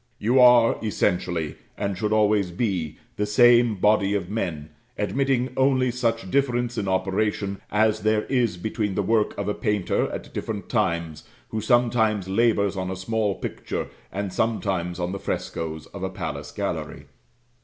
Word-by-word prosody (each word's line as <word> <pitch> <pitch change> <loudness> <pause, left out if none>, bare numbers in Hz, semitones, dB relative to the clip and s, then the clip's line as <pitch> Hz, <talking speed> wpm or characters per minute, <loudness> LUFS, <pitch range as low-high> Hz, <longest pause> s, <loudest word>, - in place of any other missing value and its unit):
You 120 +5 +2
are 120 -2 +6
essentially, 90 -6 -1 0.2
and 100 -1 -2
should 105 +3 -2
always 105 -3 +3
be, 90 -5 -2 0.2
the 105 - 0
same 120 +1 +5
body 100 0 +2
of 95 -1 -3
men, 80 -8 -3 0.3
admitting 135 -2 0
only 130 -1 +3
such 115 -5 -1
difference 120 -3 +1
in 100 -4 -2
operation 100 +1 -1
as 110 +1 +2
there 110 0 +1
is 120 -8 0
between 105 +1 -2
the 100 - 0
work 110 +1 +1
of 100 - -3
a 105 - +1
painter 105 -6 0
at - - -7
different - - -5
times, 85 -2 -1 0.2
who 110 - -3
sometimes 110 -4 +2
labours 100 -1 +2
on 95 -1 -3
a 95 - -3
small 105 +1 -1
picture, - - -5 0.2
and 100 -1 -4
sometimes 95 -6 -1
on 90 0 -2
the 100 - -4
frescoes 80 -4 -4
of - - -7
a - - -2
palace - - -5
gallery. - - -4
105 Hz, 155 wpm, -24 LUFS, 95-115 Hz, 0.3 s, are